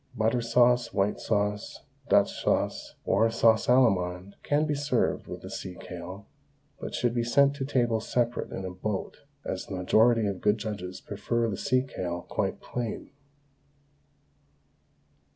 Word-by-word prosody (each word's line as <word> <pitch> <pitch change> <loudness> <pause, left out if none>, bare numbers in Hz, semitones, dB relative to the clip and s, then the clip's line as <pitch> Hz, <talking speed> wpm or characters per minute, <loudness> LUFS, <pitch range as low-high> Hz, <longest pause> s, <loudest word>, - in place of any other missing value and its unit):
Butter 115 +2 +1
sauce, 120 +1 +3
white 100 +1 0
sauce, 105 -1 -1 0.3
Dutch - - +3
sauce, - - 0
or 115 - +3
sauce 115 -1 +3
Allemande 95 -7 +2
can 145 +1 +1
be 150 - 0
served 140 -4 0
with - - -7
sea 90 -1 -6
kale, 90 +3 -8 0.5
but - - -5
should 120 -1 +1
be 120 -1 0
sent 140 +4 +4
to 135 - -2
table 120 -5 +1
separate 120 +2 -1
in 95 - -5
a 95 - -4
boat, 95 +2 -4 0.3
as 95 - -4
the 95 - -5
majority 110 +5 +4
of 100 -2 -3
good 105 +1 +3
judges 100 -4 -5
prefer 115 +3 -1
the - - -2
sea 130 +6 +1
kale 90 -9 -4
quite - - -2
plain. 120 -3 -5
110 Hz, 145 wpm, -28 LUFS, 95-120 Hz, 0.5 s, sent